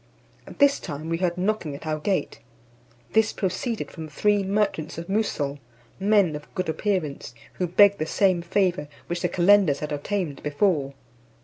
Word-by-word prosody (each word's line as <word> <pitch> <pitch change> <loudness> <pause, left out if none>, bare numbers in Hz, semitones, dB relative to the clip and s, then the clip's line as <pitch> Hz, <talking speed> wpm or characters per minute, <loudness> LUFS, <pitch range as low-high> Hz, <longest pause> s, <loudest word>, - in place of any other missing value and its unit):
At - - -11
this 285 -1 +4
time 150 +2 -6
we 165 - 0
heard 180 -1 0
knocking 185 -6 -1
at 150 - -10
our 155 -1 -2
gate. 190 +4 -1 0.7
This 220 0 +3
proceeded 210 +5 -3
from 160 -2 -7
three 205 +7 +2
merchants 195 -6 -1
of 165 - -5
Moussol, 160 -9 -1 0.4
men 195 -5 +3
of 150 - -9
good 185 -2 -2
appearance, 160 -8 -2 0.2
who 180 - +1
begged 200 +3 +5
the 155 - -2
same 185 0 +2
favour 180 -3 0 0.2
which 175 0 -3
the 180 - 0
calenders 185 -4 +4
had 150 +1 -5
obtained 150 0 -3
before. 150 -2 0
180 Hz, 165 wpm, -25 LUFS, 155-200 Hz, 0.7 s, begged